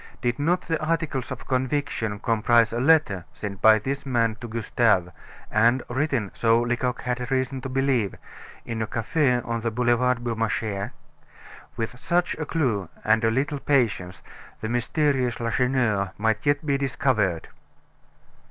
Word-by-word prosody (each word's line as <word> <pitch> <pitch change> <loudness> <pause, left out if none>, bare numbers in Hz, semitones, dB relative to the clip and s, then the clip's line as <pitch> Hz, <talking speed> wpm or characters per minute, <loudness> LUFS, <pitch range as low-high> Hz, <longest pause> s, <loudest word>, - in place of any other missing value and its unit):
Did 120 +1 -1
not 175 +5 +1
the 160 -2 -2
"articles 155 -6 -1
of - - -7
conviction" 130 -5 -1
comprise 115 +1 +2
a 120 - -1
letter 130 - +3
sent 100 -2 -6
by 110 0 +7
this 140 +6 -3
man 115 -4 +1
to 120 - -5
Gustave, 110 -5 +1 0.4
and 120 +4 +3
written, 130 -5 -1
so 115 0 +3
Lecoq 125 +1 -1
had 125 -1 -2
reason 130 0 -1
to 135 - -5
believe, 130 -6 +1 0.5
in 115 -1 -4
a 110 - -1
cafe 125 +4 +1
on 115 0 -3
the 115 - 0
Boulevard 120 +1 +1
Beaumarchais? 110 -3 -2 0.9
With 120 +2 -4
such 175 +6 +1
a 155 - -3
clue 115 - 0
and 110 +1 +3
a 115 - +4
little 140 +5 -1
patience, 105 -11 0 0.4
the 110 - -4
mysterious 125 +1 0
Lacheneur 115 -5 0
might 110 +3 0
yet 145 +2 +2
be 140 -2 +1
discovered. 115 -10 0
120 Hz, 145 wpm, -25 LUFS, 110-135 Hz, 0.9 s, by